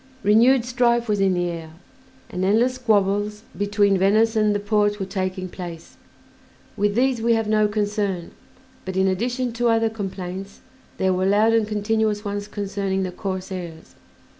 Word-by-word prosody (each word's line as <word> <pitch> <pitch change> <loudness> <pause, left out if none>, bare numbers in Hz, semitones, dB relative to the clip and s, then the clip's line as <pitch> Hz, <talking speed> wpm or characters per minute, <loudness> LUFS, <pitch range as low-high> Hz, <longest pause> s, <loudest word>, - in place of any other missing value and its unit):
Renewed 230 +4 +4
strife 240 -1 +1
was 210 -2 0
in 190 -1 +2
the 175 0 0
air, 165 -2 -6 0.6
and 180 - -3
endless 225 +6 +3
squabbles 210 -3 0
between 205 -1 +2
Venice 215 +4 +3
and 215 -1 +2
the - - 0
Porte 205 0 +1
were 195 - -2
taking 185 -1 -3
place. 175 -2 -9 0.8
With 205 -1 0
these 250 -1 +2
we 230 +1 +3
have 225 -1 0
no 215 0 +3
concern, 205 -4 -2 0.5
but, 190 0 -5
in 190 0 +3
addition 240 +6 -1
to 240 +1 0
other 225 -1 +2
complaints, 195 -2 -6 0.4
there 190 0 +1
were 185 +1 0
loud 210 +3 +4
and 225 -2 +2
continuous 210 0 0
ones 205 0 -3
concerning 200 -2 -2
the 185 - -3
corsairs. 185 -3 -6
205 Hz, 160 wpm, -22 LUFS, 190-220 Hz, 0.8 s, Renewed